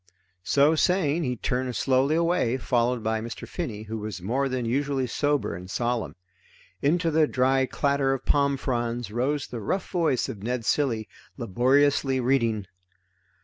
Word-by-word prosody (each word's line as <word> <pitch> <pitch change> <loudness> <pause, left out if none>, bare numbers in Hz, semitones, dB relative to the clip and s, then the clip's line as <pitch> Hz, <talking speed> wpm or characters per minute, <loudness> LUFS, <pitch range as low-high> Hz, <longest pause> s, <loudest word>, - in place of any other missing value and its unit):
So 140 - +4
saying 165 -2 +2
he 125 -1 -1
turned 125 +1 -2
slowly 135 +5 +2
away, 165 -7 +1
followed 120 -1 0
by 110 0 0
Mr. 115 +1 -7
Finney, 115 - -5
who 110 +1 -5
was 105 -2 -5
more 130 +9 -1
than 125 -2 -2
usually 135 +2 0
sober 145 - 0
and 90 +2 -8
solemn. 120 +2 -2 0.7
Into 165 +3 +2
the 155 0 +3
dry 130 0 +2
clatter 140 -1 +1
of 135 - -3
palm 140 -1 +2
fronds 120 -3 -2
rose 130 +5 -1
the 120 - -6
rough 185 - -2
voice 165 -8 +1
of 100 - -7
Ned 120 +1 -3
Cilley 115 -7 0 0.3
laboriously 135 +4 +2
reading. 115 -5 +1
130 Hz, 150 wpm, -26 LUFS, 115-145 Hz, 0.7 s, So